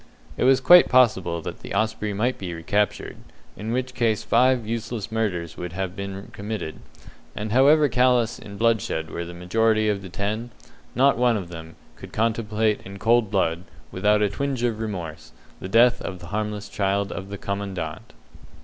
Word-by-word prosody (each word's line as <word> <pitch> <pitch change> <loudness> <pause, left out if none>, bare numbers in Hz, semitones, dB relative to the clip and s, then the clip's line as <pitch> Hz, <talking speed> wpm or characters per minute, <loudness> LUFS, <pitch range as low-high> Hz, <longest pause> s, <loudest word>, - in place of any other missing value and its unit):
It - - 0
was 135 0 +5
quite 175 +7 +7
possible 95 -10 +3
that - - -6
the - - -7
Osprey 110 0 0
might 115 +6 -1
be 90 -3 -5
recaptured, 100 +6 -1 0.4
in 110 +2 -5
which 130 +1 -2
case 115 -4 0
five 125 0 +3
useless 115 -1 -4
murders 90 -7 -2
would 90 -1 -6
have 95 0 -3
been 100 0 -7
committed; 100 -6 -5 0.6
and 105 0 -4
however 145 +5 +5
callous 125 -2 +2
in 100 -1 -10
bloodshed 105 -9 0
were 85 - -4
the 85 +1 -9
majority 110 +4 +1
of 100 -2 -1
the 95 - -9
ten, 105 +6 -3 0.5
not 135 0 +4
one 120 -2 +3
among 90 -4 -6
them 80 -1 -9 0.2
could - - -11
contemplate 110 -1 0
in 100 +1 -9
cold 115 +2 +3
blood, 90 -4 0 0.3
without 105 +3 +2
a 105 - +2
twinge 130 +4 -3
of 115 -3 0
remorse, 90 - -6 0.3
the 95 - -7
death 120 +4 +5
of 90 - -5
the 85 -1 -11
harmless 105 -1 -3
child 100 0 -1
of 95 +2 -6
the 100 - -6
Commandant. 100 -6 -5
105 Hz, 175 wpm, -24 LUFS, 95-115 Hz, 0.6 s, quite